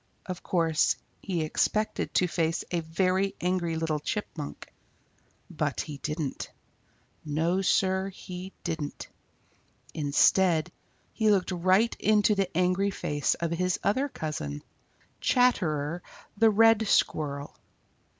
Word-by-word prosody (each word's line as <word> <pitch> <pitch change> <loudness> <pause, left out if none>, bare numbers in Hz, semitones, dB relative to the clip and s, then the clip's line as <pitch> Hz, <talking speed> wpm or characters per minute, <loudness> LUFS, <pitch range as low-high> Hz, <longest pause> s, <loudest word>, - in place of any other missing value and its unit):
Of 180 -1 -6
course 165 -3 +2 0.3
he 175 -5 -2
expected 215 +7 0
to 185 - +4
face 165 -1 -1
a 175 - +1
very 185 +4 0
angry 175 -2 0
little 160 -1 -1
Chipmunk. 155 -4 -5 0.7
But - - -2
he 150 -2 -7
didn't. 150 0 -4 0.7
No, 160 +5 0
Sir, 190 0 +2
he 185 0 -8
didn't. 160 -4 -4 0.8
Instead, 160 +3 +3 0.4
he 220 -2 +2
looked 195 -2 +2
right 185 +6 +2
into 210 0 +3
the 195 -2 0
angry 185 +2 +2
face 145 -6 -1
of 170 -1 -3
his 180 +1 0
other 265 +8 +1
cousin, 100 - -5 0.6
Chatterer 175 - +1 0.3
the 225 +2 +5
Red 225 0 +5
Squirrel. 145 -6 0
180 Hz, 110 wpm, -28 LUFS, 155-195 Hz, 0.8 s, the